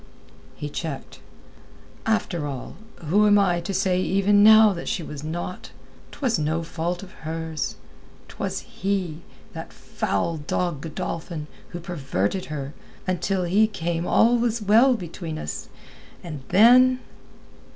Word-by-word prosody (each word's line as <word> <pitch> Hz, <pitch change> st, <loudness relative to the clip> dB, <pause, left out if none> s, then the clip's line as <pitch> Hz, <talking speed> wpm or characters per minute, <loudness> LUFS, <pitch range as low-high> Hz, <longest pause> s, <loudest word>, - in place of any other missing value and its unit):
He 150 Hz, -, -5 dB
checked. 145 Hz, -1 st, -6 dB, 0.9 s
"After 175 Hz, -8 st, 0 dB
all, 135 Hz, -3 st, -6 dB, 0.3 s
who 205 Hz, +7 st, +4 dB
am 205 Hz, 0 st, +6 dB
I 180 Hz, -4 st, +3 dB
to 170 Hz, -, -4 dB
say 185 Hz, -1 st, +1 dB
even 200 Hz, +2 st, +3 dB
now 215 Hz, -1 st, +8 dB
that 170 Hz, -, -6 dB
she 170 Hz, -, -1 dB
was 150 Hz, -2 st, -7 dB
not? 175 Hz, +3 st, -5 dB, 0.4 s
'Twas 245 Hz, -, 0 dB
no 160 Hz, +2 st, 0 dB
fault 175 Hz, +3 st, -3 dB
of 185 Hz, -, -11 dB
hers. 160 Hz, -1 st, -4 dB, 0.5 s
'Twas -, -, -4 dB
he, 185 Hz, -5 st, -3 dB, 0.3 s
that -, -, -7 dB
foul 100 Hz, -, -2 dB
dog 155 Hz, 0 st, -2 dB
Godolphin, 165 Hz, 0 st, -5 dB, 0.2 s
who 175 Hz, -, -6 dB
perverted 155 Hz, -, -2 dB
her. 145 Hz, -2 st, -5 dB, 0.3 s
Until 185 Hz, +1 st, 0 dB
he 200 Hz, +5 st, +4 dB
came 170 Hz, -4 st, -3 dB
all 235 Hz, +1 st, +4 dB
was 235 Hz, -1 st, 0 dB
well 225 Hz, +5 st, +5 dB
between 170 Hz, -5 st, -6 dB
us. 75 Hz, -, -6 dB, 0.5 s
And 155 Hz, -5 st, -6 dB
then...." 250 Hz, +6 st, +7 dB
175 Hz, 130 wpm, -24 LUFS, 160-205 Hz, 0.9 s, now